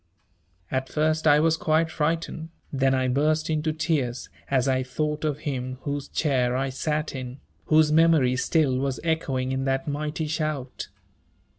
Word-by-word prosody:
At 130 0 -1
first 155 +2 +1
I 145 0 +6
was 160 +1 +3
quite 160 0 +1
frightened, 160 +1 -2 0.2
then 135 -1 +2
I 130 0 +1
burst 155 +5 +1
into 155 0 0
tears 150 -6 -1 0.2
as 130 -1 +2
I 130 -1 +2
thought 150 +4 -2
of 150 -1 -1
him 130 -3 -3
whose 145 -1 -3
chair 125 -5 +1
I 135 +1 0
sat 150 +3 -2
in, 130 0 -6 0.3
whose 155 -1 +4
memory 155 -5 +4
still 130 -1 +1
was 135 -1 -2
echoing 135 -6 -1
in 130 0 -1
that 135 +1 -1
mighty 150 +2 -2
shout. 150 -4 -3
145 Hz, 155 wpm, -25 LUFS, 130-155 Hz, 0.3 s, I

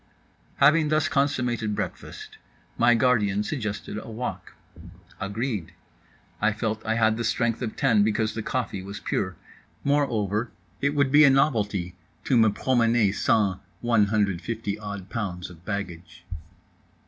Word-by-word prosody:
Having 150 +2 +4
thus 155 0 +2
consummated 125 -7 0
breakfast, - - -6 0.4
my 120 +1 +4
guardian 105 -5 +2
suggested 105 -5 -4
a - - -10
walk. 115 +3 -6 0.6
Agreed. 105 -2 -3 0.7
I 105 +1 +3
felt 110 0 -3
I 110 0 0
had 110 -1 +2
the 120 - -2
strength 115 0 0
of 115 -3 -3
ten 115 -7 +3
because 110 +1 +1
the 110 - -4
coffee 120 -5 -3
was 100 +2 -7
pure. 95 -1 -2 0.5
Moreover 115 -6 0 0.3
it 140 +1 +1
would 140 -2 +2
be 150 +2 +7
a 140 - +8
novelty 105 - +1 0.3
to 130 - +1
me 110 -2 +5
promener 115 -2 +2
sans 100 -3 +2 0.2
150 105 -2 0
odd 100 -3 -6
pounds 90 -5 -4
of 85 -1 -15
baggage. 90 -4 -6
110 Hz, 135 wpm, -25 LUFS, 100-125 Hz, 0.7 s, a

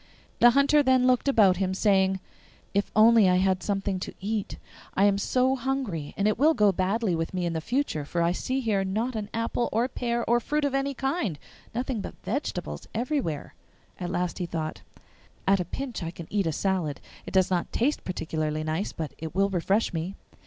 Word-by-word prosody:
The 240 - +8
Hunter 280 +4 +4
then 260 -2 +3
looked 255 +1 +3
about 205 -9 +5
him, 190 0 -1
saying, 190 -2 +3 0.5
'If 200 +1 +1
only 220 -2 +7
I 180 - +4
had 185 0 +2
something 195 -2 -1
to - - -6
eat! 210 +1 -3 0.4
I 195 - +3
am 200 -1 +4
so 255 +5 +2
hungry, 250 - -3
and 200 - +2
it 215 - +1
will 310 +3 +5
go 210 -4 +5
badly 190 +1 0
with 165 +3 -3
me 180 -1 -1
in 170 - -1
the 160 - -2
future, 245 - -1
for 170 +4 -1
I 170 - +2
see 260 +8 -2
here 210 -5 +1
not 220 +6 -2
an 210 -1 -4
apple 230 +1 -1
or 230 +3 +1
pear 235 -2 -2
or 240 +1 +4
fruit 295 +5 -1
of 280 - -1
any 275 0 0
kind 270 - -1 0.4
nothing 245 -2 -2
but - - -7
vegetables 280 +8 -3
everywhere.' 240 - -2 0.5
At 175 -2 -3
last 180 -1 -2
he 175 - -2
thought, 160 -2 -4 0.7
'At 195 0 +4
a 180 - -1
pinch 270 0 -5
I 165 - -3
can 170 -1 -9
eat 200 -4 +1
a - - +1
salad; 175 -4 -1 0.3
it - - -5
does 190 0 +4
not 175 -2 0
taste 275 +6 0
particularly 155 -3 -2
nice, 160 +6 -2
but 160 -2 -5
it 160 +1 -6
will 200 +1 +2
refresh 195 +4 +1
me. 170 +4 -3
200 Hz, 200 wpm, -27 LUFS, 180-240 Hz, 0.7 s, The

